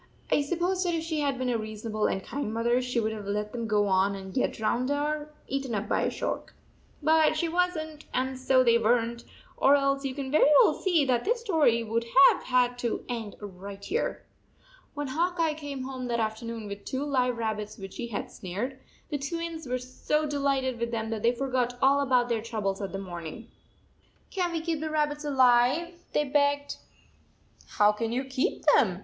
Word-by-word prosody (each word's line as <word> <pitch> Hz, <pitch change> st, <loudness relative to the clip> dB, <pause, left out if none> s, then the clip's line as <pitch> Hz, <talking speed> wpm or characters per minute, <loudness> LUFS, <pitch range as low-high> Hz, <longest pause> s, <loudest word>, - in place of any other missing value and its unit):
I -, -, +4 dB
suppose 350 Hz, +5 st, 0 dB
that 350 Hz, -2 st, 0 dB
if 320 Hz, -, -2 dB
she 320 Hz, -2 st, -2 dB
had 280 Hz, -2 st, 0 dB
been 255 Hz, -1 st, -1 dB
a 230 Hz, -, 0 dB
reason 215 Hz, +1 st, -6 dB
able 215 Hz, 0 st, +1 dB
and 190 Hz, -, -2 dB
kind 280 Hz, -6 st, -4 dB
mother 235 Hz, +2 st, +1 dB
she 250 Hz, -1 st, -1 dB
would 220 Hz, -1 st, 0 dB
have 210 Hz, -2 st, -6 dB
let 210 Hz, +1 st, -2 dB
them 230 Hz, -2 st, -4 dB
go 210 Hz, -1 st, +2 dB
on 195 Hz, +1 st, +2 dB
and 190 Hz, -1 st, -8 dB
get 255 Hz, -, +1 dB
drowned 240 Hz, +4 st, 0 dB
or 295 Hz, +1 st, -1 dB, 0.2 s
eaten 270 Hz, -3 st, -2 dB
up 205 Hz, +1 st, -2 dB
by -, -, +1 dB
a -, -, +1 dB
shark. -, -, -4 dB, 0.5 s
But 315 Hz, 0 st, +4 dB
she 335 Hz, -, 0 dB
was 360 Hz, +1 st, +1 dB
n 310 Hz, -1 st, -6 dB
t, -, -, -16 dB
and 260 Hz, +1 st, -1 dB
so 260 Hz, 0 st, +4 dB
they 235 Hz, -1 st, +4 dB
were 230 Hz, +2 st, +4 dB
n 235 Hz, 0 st, -3 dB
t, 235 Hz, -, -15 dB, 0.3 s
or 280 Hz, -, +5 dB
else 275 Hz, 0 st, +1 dB
you 265 Hz, -2 st, -3 dB
can 275 Hz, -2 st, -4 dB
very 300 Hz, 0 st, +5 dB
well -, -, +4 dB
see 340 Hz, -7 st, +2 dB
that 245 Hz, -2 st, +1 dB
this 470 Hz, +2 st, 0 dB
story 310 Hz, -, +3 dB
would 230 Hz, +1 st, -1 dB, 0.3 s
have -, -, -4 dB
had 245 Hz, -1 st, +2 dB
to 235 Hz, -2 st, -2 dB
end 230 Hz, -4 st, -4 dB
right 200 Hz, 0 st, -9 dB
here. 455 Hz, +6 st, -2 dB, 0.7 s
When 290 Hz, 0 st, -3 dB
Hawk 345 Hz, +5 st, 0 dB
Eye 325 Hz, -2 st, +2 dB
came 290 Hz, -3 st, -6 dB
home 260 Hz, -1 st, -5 dB
that 235 Hz, -1 st, -1 dB
after 220 Hz, +1 st, -2 dB
noon 230 Hz, -1 st, -5 dB
with 200 Hz, 0 st, -7 dB
two 265 Hz, +1 st, -3 dB
live 250 Hz, -4 st, +1 dB
rabbits 215 Hz, -2 st, -3 dB
which 195 Hz, -1 st, -9 dB
he 235 Hz, -, -4 dB
had 220 Hz, -3 st, -5 dB
snared, 215 Hz, +9 st, -5 dB, 0.3 s
the 290 Hz, -, -1 dB
Twins 330 Hz, +1 st, -4 dB
were 250 Hz, +1 st, 0 dB
so 255 Hz, +5 st, -1 dB
delighted 275 Hz, -4 st, 0 dB
with 235 Hz, 0 st, -1 dB
them 225 Hz, -1 st, -3 dB
that 220 Hz, -2 st, -3 dB
they 235 Hz, -, +4 dB
forgot 250 Hz, -1 st, -1 dB
all 275 Hz, +2 st, +4 dB
about 255 Hz, -3 st, +3 dB
their 230 Hz, -2 st, 0 dB
troubles 215 Hz, -4 st, -3 dB
of 195 Hz, -, -4 dB
the 195 Hz, -, -4 dB
morning. 180 Hz, +3 st, -7 dB, 0.4 s
" -, -, -36 dB
Can 360 Hz, -2 st, -1 dB
t 335 Hz, -, -1 dB
we 320 Hz, -, -5 dB
keep 330 Hz, -3 st, -1 dB
the 315 Hz, +1 st, -3 dB
rabbits 300 Hz, -1 st, 0 dB
alive?" 265 Hz, +4 st, +3 dB, 0.2 s
they 295 Hz, -, +3 dB
begged. 285 Hz, 0 st, +1 dB, 0.5 s
" -, -, -30 dB
How 210 Hz, 0 st, +6 dB
can 225 Hz, +2 st, -3 dB
you 250 Hz, +3 st, -1 dB
keep 265 Hz, 0 st, -2 dB
them?" 190 Hz, -9 st, +3 dB
255 Hz, 220 wpm, -28 LUFS, 225-290 Hz, 0.7 s, How